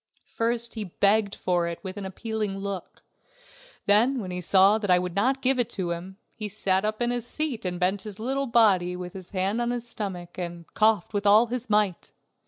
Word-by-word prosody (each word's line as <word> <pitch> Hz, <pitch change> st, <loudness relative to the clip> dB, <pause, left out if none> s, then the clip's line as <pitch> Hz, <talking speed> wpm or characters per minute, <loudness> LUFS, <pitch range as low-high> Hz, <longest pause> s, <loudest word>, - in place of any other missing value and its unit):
First 235 Hz, 0 st, 0 dB
he 220 Hz, -2 st, -4 dB
begged 200 Hz, +3 st, +2 dB
for 175 Hz, -2 st, 0 dB
it 170 Hz, -1 st, -4 dB
with 190 Hz, -1 st, -6 dB
an 200 Hz, -2 st, -5 dB
appealing 215 Hz, 0 st, -4 dB
look; 195 Hz, -2 st, -6 dB, 0.8 s
then 235 Hz, +6 st, +4 dB
when 185 Hz, -5 st, -5 dB
he 180 Hz, 0 st, -4 dB
saw 195 Hz, +4 st, +5 dB
that 205 Hz, -3 st, -4 dB
I 180 Hz, -, +6 dB
would 180 Hz, 0 st, -3 dB
not 260 Hz, +7 st, +1 dB
give 260 Hz, 0 st, +3 dB
it 240 Hz, -, +1 dB
to 180 Hz, -3 st, -2 dB
him, 180 Hz, +3 st, -6 dB, 0.2 s
he 215 Hz, -2 st, -5 dB
sat 190 Hz, -2 st, 0 dB
up 215 Hz, +2 st, -1 dB
in 240 Hz, -, +1 dB
his 240 Hz, -1 st, -2 dB
seat 290 Hz, -9 st, -2 dB
and 180 Hz, -1 st, -3 dB
bent 190 Hz, +2 st, +1 dB
his 210 Hz, -3 st, -8 dB
little 270 Hz, +5 st, -2 dB
body 195 Hz, -7 st, +4 dB
with 180 Hz, -1 st, -7 dB
his 185 Hz, -2 st, -8 dB
hand 195 Hz, +4 st, -1 dB
on 240 Hz, -, 0 dB
his 240 Hz, -1 st, -3 dB
stomach, 185 Hz, -6 st, -5 dB
and 170 Hz, -1 st, -6 dB
coughed 215 Hz, -3 st, +2 dB
with 205 Hz, 0 st, 0 dB
all 215 Hz, +3 st, +7 dB
his 245 Hz, 0 st, -5 dB
might. 210 Hz, -4 st, +1 dB
205 Hz, 210 wpm, -26 LUFS, 185-230 Hz, 0.8 s, all